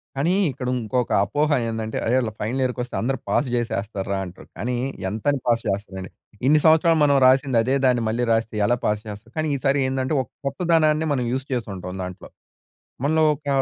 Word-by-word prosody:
కానీ, 150 +6 +1 0.2
ఇక్కడ 125 -1 -6
ఇంకొక 120 +2 -1
అపోహ 145 +9 0 0.2
ఏందంటే, 110 0 -3
అరే 115 - +1
వీళ్ళు 115 -4 -2
ఫైనల్ 125 +5 -1
ఇయర్‌‌కొస్తే, 125 -1 -3
అందరూ 135 +3 0
పాస్ 145 - +1
జేసేస్తార్రా 100 -4 -2
అంటారు. 90 +1 -12
కానీ, 120 +6 -2 0.3
ఎంతని 135 +7 0
పాస్ 115 -1 +2
చేస్తారండి. 95 -1 -4 0.4
ఇన్ని 150 +1 +5
సంవత్సరాలు 160 0 +5
మనం 140 -1 +4
రాసింది 130 -1 +4
అదే 130 +3 +1
దాన్ని 125 -2 +3
మళ్ళీ 120 +3 0
రాస్తే 115 -1 0
ఎలా 120 - +2
పాస్ 105 0 +1
చేస్తారు? 105 +3 -9
కానీ 155 -1 0
ఈసారి 140 +1 +1
ఏందంటే, 130 +3 -1
ఒక - - -20 0.2
కొత్తదనాన్ని 160 0 +2
మనం 125 -3 -1
యూజ్ 130 0 -2
చేసుంటాం 95 -6 -4
దాంట్లో. 90 -1 -8 0.8
మనలో 160 +1 +3
ఒక 145 0 -15
125 Hz, 170 wpm, -23 LUFS, 110-140 Hz, 0.8 s, ఇన్ని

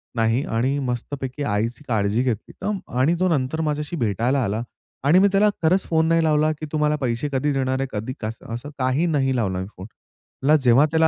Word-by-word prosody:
नाही 115 +3 +2
आणि 130 +5 0
मस्तपैकी 130 +3 -4
आईची 115 +3 -1
काळजी 105 0 +1
घेतली 115 -5 -3 0.5
आणि 150 +7 +3
तो 185 - +3
नंतर 150 0 0
माझ्याशी 150 +1 -2
भेटायला 120 - +1
आला 105 +3 -1 0.4
आणि 150 +7 +5
मी 200 - +6
त्याला 200 +2 +4
खरंच 180 +4 +3
फोन 160 -1 +3
नाही 165 0 +3
लावला, 155 0 +3
की 155 +1 -7
तू 155 - -1
मला 150 0 +2
पैसे 125 +3 -1
कधी 140 +3 +1
देणार 130 -1 0
आहे, 135 - -1
कधी 110 +4 -4
कसं, 110 +1 -6
असं 120 +5 -5
काही 130 +5 +1
नाही 135 -5 +1
लावला 95 -6 0
मी 95 - -4
फोन. 95 +2 -8 0.6
म्हटलं 150 +3 +5
जेव्हा 125 +4 +6
त्याला 160 0 +4
135 Hz, 200 wpm, -23 LUFS, 115-155 Hz, 0.6 s, मी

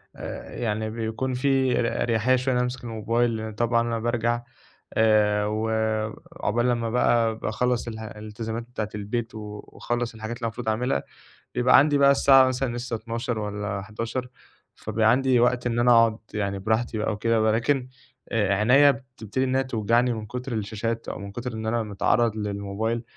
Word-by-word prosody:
آآ، - - -7
يعني 110 -1 -1
بيكون 115 +3 -3
في 130 -1 +2
ر 115 - 0
أريحية 120 +2 +2
شوية 130 +1 0
إن - - +1
أنا 125 - +2
أمسك 125 0 -5
الموبايل 115 +1 0
لإن 110 0 -5
طبعًا 115 +1 +2
أنا 115 -1 -1
بارجع 120 0 0 0.5
آآ، 105 -2 +3
وعُقبال 110 +1 -1
لمّا 115 -2 0
بقى 115 -2 +2
باخلّص 120 +2 -1
الح 110 -1 -6
الإلتزامات 110 +2 -6
بتاعة 115 -3 -5
البيت 110 +2 -3
و 105 -1 -7
وأخلّص 120 -1 -3
الحاجات 110 +1 -5
اللي 120 - -7
أنا - - +1
المفروض 115 0 -6
أعملها، 110 - 0 0.5
بيبقى 125 +1 +5
عندي 145 +1 +4
بقى 140 0 +6
الساعة 135 -1 +6
مثلًا 130 -1 -1
لسه 120 -1 -3
00:00 115 +1 -3
والّا 105 -1 -3
23:00، 115 +5 -4 0.5
فبيبقى 110 +1 +1
عندي 130 -1 +3
وقت 125 0 +2
إن 120 0 0
أنا 120 0 +4
أقعد 115 -1 +5 0.2
يعني 100 -2 -2
براحتي 110 +3 0
بقى 105 - 0
وكده، 115 +1 +1
ولكن 120 +4 +1 0.4
آآ، 105 -3 +2
عينيا 135 +7 +6
بتبتدي 130 -1 -4
إن 130 0 0
هي 135 - +2
توجعني 120 0 +1
من 110 -1 -5
كُتر 125 +3 -5
الشاشات، 110 +2 -3
أو - - -5
من 100 0 -7
كُتر 120 +3 -5
إن 110 0 -5
أنا 115 0 0
متعرّض 110 +2 +1
للموبايل 105 +2 -2
115 Hz, 175 wpm, -25 LUFS, 110-125 Hz, 0.5 s, بقى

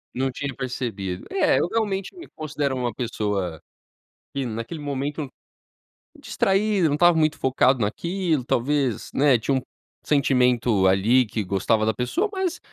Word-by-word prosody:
Não 130 +1 0
tinha 135 +1 -4
percebido. 115 -8 -4
É, 390 - +3
eu - - +1
realmente 205 - -2
me 345 - -11
considero 145 -3 -2
uma 125 -3 -2
pessoa, 105 -8 -2 0.8
que 135 -2 -1
naquele 115 +7 -5
momento 145 +1 -3 0.9
Distraído, 195 -2 +1
não 145 - +1
estava 175 +1 +5
muito 155 -1 +2
focado 130 0 +2
naquilo, 165 - -1
talvez, 130 0 0
né, 135 -3 +4
tinha 135 +5 -1
um 130 - 0 0.4
sentimento 125 -8 +2
ali 110 +7 +4
que 105 0 -3
gostava 100 +4 +1
da 110 - +1
pessoa 325 - -1
mas, 375 -3 -2
130 Hz, 140 wpm, -24 LUFS, 115-155 Hz, 0.9 s, estava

